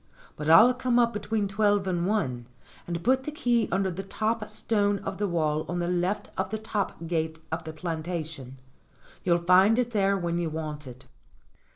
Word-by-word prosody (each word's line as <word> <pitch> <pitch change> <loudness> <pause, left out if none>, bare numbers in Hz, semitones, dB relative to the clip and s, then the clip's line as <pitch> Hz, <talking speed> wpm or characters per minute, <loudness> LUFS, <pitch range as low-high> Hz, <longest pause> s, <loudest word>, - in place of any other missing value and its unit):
But 150 +1 -3
I'll 225 +10 +8
come 250 -1 0
up 235 -1 +3
between 210 0 -1
twelve 205 0 +2
and 175 -1 0
one, 125 - -1 0.4
and 170 -1 -4
put 260 +2 +3
the 300 - -4
key 240 -6 +1
under 190 +1 +1
the 180 +2 -5
top 215 +3 -2
stone 205 -2 +1
of 190 - -5
the 205 - +1
wall 155 -3 0
on 175 - -2
the 175 0 -1
left 180 +3 -1
of 190 0 -1
the 220 - -2
top 210 -5 -3
gate 160 -1 -2
of 160 0 -3
the 160 - -5
plantation. 160 -5 -5 0.7
You'll 170 -2 +3
find 185 +6 +5
it 245 -1 0
there 200 -2 +2
when 170 -2 -1
you 170 -2 -1
want 155 -2 -5
it." 125 0 -11
185 Hz, 190 wpm, -27 LUFS, 165-210 Hz, 0.7 s, I'll